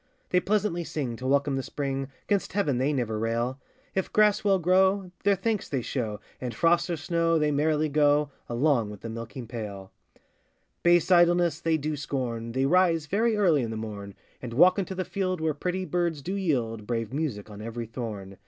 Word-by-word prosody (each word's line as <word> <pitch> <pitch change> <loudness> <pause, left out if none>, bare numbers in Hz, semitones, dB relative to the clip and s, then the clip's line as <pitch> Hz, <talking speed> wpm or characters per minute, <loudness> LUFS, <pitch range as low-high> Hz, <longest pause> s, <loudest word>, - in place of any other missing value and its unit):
They 180 - +4
pleasantly 190 -2 0
sing 135 -7 -3
to 130 - -5
welcome 140 0 +2
the - - 0
spring, 135 0 -3 0.2
'Gainst 200 -2 0
heaven 150 -11 +1
they 135 +3 +2
never 115 -6 -1
rail; 115 +4 -1 0.3
If 190 - -1
grass 210 -1 +4
well 200 -2 +4
grow, 190 +2 +2
their 200 0 +4
thanks 210 +2 -2
they 135 -4 -1
show, 110 -6 -3 0.2
And, 125 -3 -4
frost 170 +7 +3
or 170 - -1
snow, 165 +1 +1
they 150 -1 +2
merrily 155 +1 +1
go 145 0 +3 0.2
Along 120 -2 +2
with 105 -1 -10
the 115 - -6
milking 115 +1 -7
pail: 105 -5 -7 0.9
Base 175 +1 +4
idleness 175 -2 +4
they 165 -1 +2
do 155 +1 -2
scorn, 120 -5 -3
They 130 +1 +1
rise 170 0 +3
very 215 +7 +1
early 170 -10 +3
i' - - -2
th' 110 0 -4
morn, 100 -3 -7 0.3
And 120 -2 -6
walk 180 +7 +6
into 190 0 -3
the 185 0 -2
field, 185 -3 -2
where 160 -1 0
pretty 180 +5 -2
birds 170 -3 -1
do 185 - -3
yield 120 - -1
Brave 115 -1 -2
music 125 -9 -3
on 105 0 -9
every 115 +1 -5
thorn. 105 -5 -6
150 Hz, 190 wpm, -27 LUFS, 115-180 Hz, 0.9 s, walk